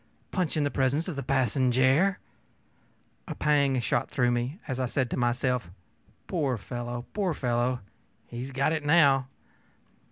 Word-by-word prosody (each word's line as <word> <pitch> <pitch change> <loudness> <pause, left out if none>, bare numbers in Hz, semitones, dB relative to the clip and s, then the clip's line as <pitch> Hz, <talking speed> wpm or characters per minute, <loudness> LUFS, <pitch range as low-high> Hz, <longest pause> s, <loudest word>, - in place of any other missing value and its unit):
Punch 180 -5 -1
in 150 - +2
the 145 - 0
presence 140 +5 0
of 180 - -4
the 140 - -3
passenjare!ö 130 - +2 1.2
A - - -4
pang 140 -3 +2
shot 120 - 0
through 125 -2 +1
me 120 +6 -2
as 130 -3 -3
I 130 - 0
said 125 0 -1
to - - 0
myself, 125 -3 0 0.6
ōPoor 140 -9 0
fellow, 120 +2 -5
poor 190 -6 0
fellow! 125 0 0 0.4
he 120 - -8
has 130 +2 -5
got 140 +4 +1
it, 155 -2 -2
now. 140 -4 +4
130 Hz, 155 wpm, -28 LUFS, 125-145 Hz, 1.2 s, now